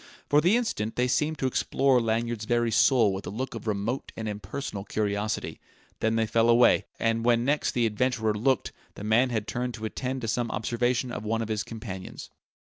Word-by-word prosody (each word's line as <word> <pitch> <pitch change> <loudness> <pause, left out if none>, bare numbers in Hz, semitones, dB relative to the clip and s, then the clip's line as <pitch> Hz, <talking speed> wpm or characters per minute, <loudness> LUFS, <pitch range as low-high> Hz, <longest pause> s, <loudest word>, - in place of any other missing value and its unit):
For 145 +1 +4
the 180 +8 +4
instant 115 - -2
they 125 +1 +1
seemed 150 +5 0
to 135 - -2
explore 130 0 +2
Lanyard's 115 -1 -1
very 120 0 +1
soul 115 -3 +4
with 95 - -6
a - - -2
look 130 +6 -4
of 115 -1 -7
remote 105 +5 -2
and 110 - -4
impersonal 105 +1 -5
curiosity; 105 0 -2 0.4
then 110 0 +1
they 115 0 +2
fell 115 +1 +2
away; 120 +1 +5
and 115 0 0
when 120 0 +3
next 145 +2 +1
the 120 -1 +2
adventurer 110 0 0
looked, 125 +2 +1 0.2
the - - -8
man 115 +4 +3
had 110 -3 -2
turned 125 0 -3
to 110 - -6
attend 130 +4 -3
to 115 - -3
some 115 +1 -1
observation 120 +3 -1
of 110 - -5
one 115 +1 -1
of 110 - -7
his 110 -1 -1
companions. 110 -5 -8
115 Hz, 200 wpm, -27 LUFS, 110-125 Hz, 0.4 s, away